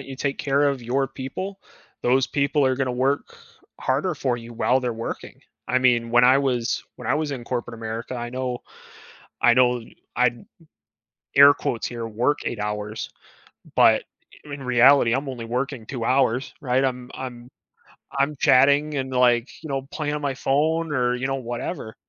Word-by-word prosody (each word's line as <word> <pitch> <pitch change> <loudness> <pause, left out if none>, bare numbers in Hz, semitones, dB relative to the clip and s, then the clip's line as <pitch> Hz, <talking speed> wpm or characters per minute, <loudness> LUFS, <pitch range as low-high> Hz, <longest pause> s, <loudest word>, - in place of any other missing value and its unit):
and 135 - -11
you 135 - -7
take 140 0 -2
care 140 +1 +2
of 135 -3 -3
your 130 +3 0
people, 145 +10 -6 0.4
those 130 +2 +3
people 140 +1 +1
are 130 0 +1
gonna 130 -1 -1
work 135 +3 -1 0.4
harder 145 +7 0
for 130 -4 -1
you 120 0 -10
while 125 +3 +2
they're 125 -2 -2
working. 115 0 -7 0.3
I 130 - +2
mean, 120 -2 +2
when 120 +1 +5
I 130 +2 +6
was, 125 -4 0
when - - -9
I - - +2
was 150 -1 -1
in 130 -4 -5
corporate 120 -1 -4
America, 115 +2 -5
I 120 -1 -5
know, 125 -1 -3 0.8
I 120 - +6
know, 125 -1 +3 0.3
I 125 0 +4 1.1
air 140 +1 +9
quotes 115 - -3
here, 115 -1 -5
work 120 +7 0
8 115 - -3
hours, 105 +1 -4 0.7
but - - +5 0.4
i 145 - -8
in 140 -1 -7
reality, 125 0 +5
I'm 135 +2 -1
only 120 -3 -6
working 125 0 -3
2 120 0 -5
hours, 130 0 +1
right? 130 -1 +1
I'm, 125 -1 -2
I'm, 125 -2 -7 0.7
I'm 140 +2 +1
chatting 140 +4 +4
and 130 -1 -2
like, 125 -1 +3
you 160 - -7
know, 135 -1 -3
playing 150 -2 -3
on 150 - -3
my 140 -2 -1
phone 155 +4 0
or, 125 -2 +1
you 125 +1 -3
know, 135 - -1
whatever. 120 -3 -5
130 Hz, 180 wpm, -23 LUFS, 120-140 Hz, 1.1 s, air